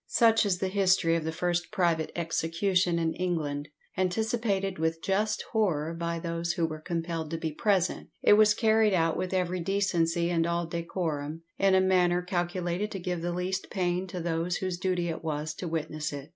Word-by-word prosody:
Such 225 -2 +4
is 185 -3 +1
the 190 - -1
history 185 -4 +3
of 165 -2 -1
the 160 - -1
first 175 +1 -1
private 170 -6 +1
execution 170 +2 +1
in 165 -1 0
England. 155 -5 -2 0.3
Anticipated 195 0 0
with 160 0 0
just 210 +4 0
horror 170 -8 +1
by 170 0 -3
those 170 0 -2
who 170 -2 0
were 155 -1 -5
compelled 165 -1 -3
to 165 - -3
be 160 -1 -3
present, 190 +2 0
it - - +7
was 210 0 +6
carried 220 -2 +3
out 165 -2 +2
with 185 - -2
every 185 -1 0
decency 170 -2 +1
and 165 -1 +1
all 170 0 0
decorum, 165 -2 -3 0.2
in 195 -1 +4
a 190 - +5
manner 180 -1 +3
calculated 175 +1 -2
to 195 - -4
give 180 -1 -3
the 175 +1 -2
least 180 +2 -2
pain 180 -1 -1
to 180 0 -5
those 170 +1 -1
whose 185 -2 -3
duty 180 -2 0
it 165 -1 -4
was 155 -1 -2
to 180 - -6
witness 155 -2 -3
it. 145 +1 -7
175 Hz, 185 wpm, -28 LUFS, 165-190 Hz, 0.3 s, it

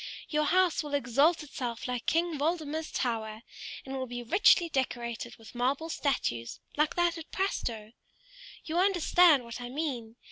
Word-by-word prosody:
Your 300 -1 +1
house 365 0 +3
will 295 -2 -3
exalt 285 +5 +3
itself 245 -5 -5
like 250 -1 -4
King 330 -2 +1
Waldemar's 315 0 -1
tower, 220 -2 -2 0.4
and 270 0 -5
will 260 -1 -3
be 245 0 -5
richly 355 - +5
decorated 240 -5 -3
with 225 - -14
marble 270 +6 0
statues, 180 - -1 0.2
like 300 +1 +1
that 345 -1 +1
at 325 - -10
Prastoe. 230 - -2 0.7
You 330 +2 -1
understand 350 -6 +5
what 235 +1 -7
I 245 - -6
mean. 250 -6 -4
280 Hz, 150 wpm, -30 LUFS, 240-325 Hz, 0.7 s, richly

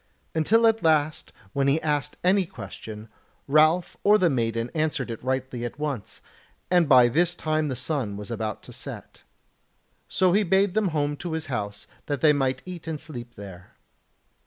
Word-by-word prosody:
Until 215 +9 +3
at 225 -1 +3
last 155 -2 +1 0.2
when 140 0 +1
he 140 +3 +3
asked 150 -2 -1
any 185 0 +3
question 110 - -9 0.4
Ralph 155 +5 +3
or 210 +1 +6
the 180 -5 +3
maiden 115 -1 -1
answered 155 -6 -1
it 115 - -7
rightly 130 -1 -2
at 120 +2 -5
once; 145 -9 -4 0.5
and 175 -4 +4
by 125 -3 +8
this 170 +8 +2
time 155 -2 0
the 130 - -2
sun 130 -6 -3
was 105 +3 -7
about 110 -2 -4
to - - -11
set. - - -8 0.9
So 185 -2 +3
he 205 - +4
bade 195 0 +2
them 215 -1 +2
home 145 -3 0
to 175 0 -5
his 160 -1 -2
house 100 -2 -4 0.2
that 145 -2 -2
they 155 -2 +6
might 130 -2 0
eat 180 -3 -8
and 160 -2 -3
sleep 120 -7 -9
there. 95 -3 -11
150 Hz, 175 wpm, -25 LUFS, 120-170 Hz, 0.9 s, by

